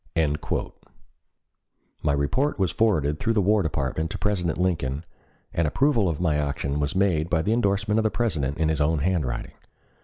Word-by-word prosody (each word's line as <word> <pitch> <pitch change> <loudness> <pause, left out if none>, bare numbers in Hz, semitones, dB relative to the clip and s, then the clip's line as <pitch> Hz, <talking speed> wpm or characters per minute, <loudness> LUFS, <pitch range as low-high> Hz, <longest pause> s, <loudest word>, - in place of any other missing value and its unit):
My 75 -2 +1
report 70 - 0
was 95 -5 +1
forwarded 80 -10 +1
through 115 +2 +1
the 110 - +2
War 105 +2 +3
Department 80 0 -2
to - - -4
President 90 -6 -1
Lincoln 80 -5 -1 0.5
and 85 -1 +1
approval 115 - +2
of 80 - -3
my 80 -4 +1
action 70 -1 -2
was 75 +5 -1
made 90 -5 +1
by 80 -3 +1
the 110 - +1
endorsement 105 -1 +1
of - - +1
the 110 - +2
President 75 - -1
in 80 -1 +1
his 80 -1 0
own 80 +2 +2
handwriting. 75 -6 -1
85 Hz, 165 wpm, -25 LUFS, 75-105 Hz, 0.5 s, War